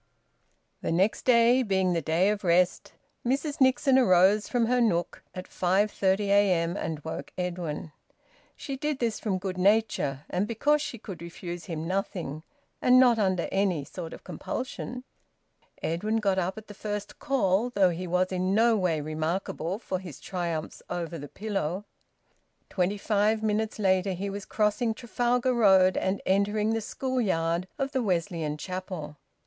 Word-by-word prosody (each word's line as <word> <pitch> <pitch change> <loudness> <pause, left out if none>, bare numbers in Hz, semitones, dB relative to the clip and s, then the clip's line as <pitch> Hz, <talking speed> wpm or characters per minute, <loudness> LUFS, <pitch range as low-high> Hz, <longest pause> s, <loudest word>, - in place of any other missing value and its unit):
The - - -2
next 190 +6 +1
day 240 +1 +5
being 190 -5 +1
the 165 - 0
day 170 +6 +2
of 210 -1 -3
rest, 180 0 +2 0.3
Mrs 280 +4 -1
Nixon 260 +1 +4
arose 195 -1 +4
from 245 -2 +1
her 250 +2 +2
nook 175 -7 0
at 185 0 -6
5:30 190 +1 +1
a.m. 195 -4 +2
and 160 -6 -3
woke 160 - -5
Edwin. 175 -4 -4 0.6
She 275 - -5
did 295 +1 -2
this 235 -3 -1
from 200 -4 -1
good 185 -1 -4
nature, 195 -9 +1
and 185 +3 -1
because 290 +7 +2
she 250 - -5
could 195 -5 -9
refuse 170 0 -7
him 165 -2 -4
nothing, 180 -5 -3 0.4
and 255 0 +6
not 245 -3 +5
under 185 -4 +1
any 195 -6 +1
sort 165 +2 -7
of - - -10
compulsion. 250 - -5 0.8
Edwin 210 +7 0
got 200 -3 +1
up 185 +3 -2
at 220 - -9
the 210 - -9
first 205 0 -5
call, 235 -5 +1
though 195 -6 +3
he 180 +2 -5
was 180 +2 +1
in 185 +1 0
no 230 +1 +4
way 180 -6 0
remarkable 160 +3 -2
for 190 -4 -4
his 170 -7 -9
triumphs 170 0 -4
over 170 -1 -4
the 145 - -7
pillow. 195 -1 -3 0.9
Twenty 190 +2 0
five 215 +1 +1
minutes 215 0 0
later 190 -2 +2
he 195 +2 -4
was 200 0 -6
crossing 220 +2 0
Trafalgar 245 +2 0
Road 190 -5 +5
and 190 +1 -1
entering 205 +3 +2
the 225 - -1
school 260 +3 -2
yard 170 -3 0
of 270 -2 -2
the 260 - 0
Wesleyan 170 -6 -1
Chapel. 180 -4 -6
195 Hz, 160 wpm, -27 LUFS, 175-220 Hz, 0.9 s, and